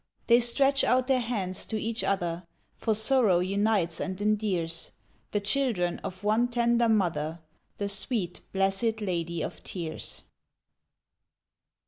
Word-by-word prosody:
They 235 0 +6
stretch 270 +3 +2
out 255 0 +3
their 260 -1 +3
hands 205 -6 -3
to 220 - -2
each 225 +2 -2
other, 175 -3 -1 0.3
For 220 -2 0
Sorrow 220 -4 +4
unites 190 -2 +1
and 185 0 -3
endears, 200 -6 -1 0.4
The 205 - 0
children 205 -5 0
of 185 +2 -7
one 220 +4 +3
tender 235 -1 +2
mother 170 -6 +1 0.4
The 200 - -2
sweet, 200 -2 -2
blessed 195 +4 +1
Lady 170 -5 -2
of - - -6
Tears. 170 -4 -6
205 Hz, 125 wpm, -28 LUFS, 180-235 Hz, 0.4 s, They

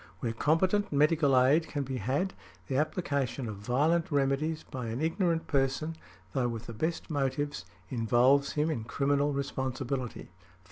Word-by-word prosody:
Where 115 +1 -2
competent 185 - +2
medical 145 -2 +4
aid 145 +6 +4
can 145 -2 -2
be 130 -1 -4
had, 135 - -1 0.3
the 130 - -3
application 140 -5 -1
of 105 -2 -5
violent 145 +10 +1
remedies 145 +3 +1
by 125 -5 -6
an 115 +2 -3
ignorant 165 +1 0
person, 140 +3 0 0.4
though 130 -3 +1
with 115 -1 -5
the 115 - -7
best 160 +8 -2
motives, 145 - -1 0.3
involves 125 +4 +3
him 150 +2 +1
in 115 -7 -3
criminal 140 +4 +1
responsibility. 130 -4 -3
140 Hz, 145 wpm, -30 LUFS, 125-155 Hz, 0.4 s, medical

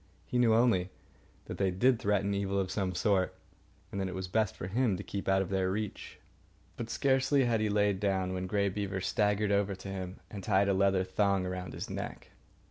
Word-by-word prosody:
He 125 - -1
knew 115 -2 +5
only 110 -6 +3 0.6
that - - -7
they 95 -1 +2
did 120 +7 +3
threaten 100 -1 +1
evil 100 0 0
of 95 -1 -1
some 95 -2 -1
sort, 95 -1 +1 0.6
and 100 - -3
that 95 - -1
it 90 - -5
was 95 0 -4
best 110 +2 0
for - - -6
him 105 +1 +1
to 100 - -6
keep 100 0 -5
out 95 0 +3
of 95 - -8
their 95 -1 +1
reach. 105 +1 -4 0.6
But 115 -1 -5
scarcely 135 +2 +2
had 115 -2 +2
he 110 - +1
lain 105 -2 +2
down 95 -2 0
when 95 0 -3
Grey 100 +1 +1
Beaver 95 -1 -3
staggered 105 +1 +1
over 100 -1 +1
to 95 +1 -9
him 95 -1 -5
and 100 -2 -7
tied 100 0 +3
a - - +3
leather 95 -1 +3
thong 95 0 +1
around 90 -1 -5
his - - -5
neck. - - -6
100 Hz, 210 wpm, -31 LUFS, 95-105 Hz, 0.6 s, knew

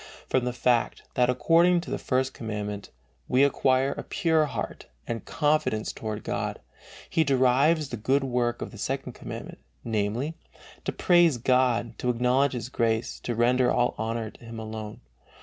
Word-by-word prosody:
From 130 -1 +1
the 125 - 0
fact, 120 -1 +1
that 125 0 +3
according 170 +7 +4
to 170 - -8
the - - -2
First 130 0 0
Commandment, 105 -2 -5 0.4
we 130 +2 +4
acquire 135 -1 +3
a - - -4
pure 160 -2 +2
heart - - -5 0.2
and 115 -1 -4
confidence 150 -8 0
toward 110 -1 -5
God, - - -3 0.5
he 160 - +2
derives 140 +3 +3
the 120 - -4
good 135 +6 +1
work 120 -2 0
of - - -7
the 110 - -11
Second 130 +1 -3
Commandment, - - -8 0.2
namely, 115 +7 -1 0.5
"to - - 0
praise 175 -6 +4
God, 120 -2 +2
to 125 - -1
acknowledge 125 +3 +2
His 120 -2 -4
grace, 115 -2 0
to 120 - -3
render 125 +2 +3
all 120 0 +2
honor 110 0 -2
to - - -18
Him 115 0 -8
alone." 110 -1 -7
125 Hz, 165 wpm, -27 LUFS, 115-135 Hz, 0.5 s, according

